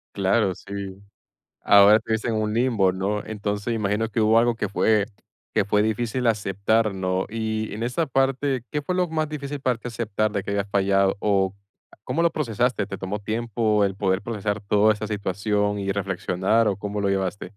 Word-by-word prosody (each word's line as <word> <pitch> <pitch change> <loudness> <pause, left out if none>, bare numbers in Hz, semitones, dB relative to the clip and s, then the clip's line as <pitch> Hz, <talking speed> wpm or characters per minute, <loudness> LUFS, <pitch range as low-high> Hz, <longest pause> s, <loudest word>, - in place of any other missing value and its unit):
Claro, 100 0 +2
sí. 100 0 -8 0.6
Ahora 100 +2 +7
te 110 - -13
ves 110 - -1
en 115 - 0
un 110 -1 -1
limbo, 115 -6 +2
¿no?, 100 +3 -2
entonces, 105 +1 -3
imagino 110 0 0
que 115 +1 -2
hubo 110 +1 +4
algo 120 0 +2
que 105 - -2
fue 105 +1 +2 0.5
que - - +3
fue 105 0 +2
difícil 115 +3 -1
aceptar, 105 0 +1
¿no? 95 0 -1
Y 110 0 -3
en 110 +3 -4
esa 150 +7 -1
parte, 135 -1 0
¿qué 150 - -1
fue 180 +5 -2
lo 180 -1 +2
más 155 -1 -1
difícil 145 -1 -5
para 125 -4 0
ti 125 - -10
aceptar 110 -2 -2
de 100 - -1
que 100 - -6
habías 100 0 -1
fallado? 100 -1 +2
¿O 100 -2 +1 0.5
cómo 165 - -1
lo 170 - +3
procesaste? 120 -5 0
¿Te 100 - -6
tomó 100 +2 -4
tiempo 110 -1 0
el 95 - -1
poder 95 0 0
procesar 105 -1 -3
toda 105 +1 +3
esa 105 +1 -5
situación 105 0 -1
y 100 0 -1
reflexionar 100 +2 0
o 100 - +1
cómo 105 0 -4
lo 100 - +1
llevaste? 95 0 -1
105 Hz, 190 wpm, -24 LUFS, 100-115 Hz, 0.6 s, Ahora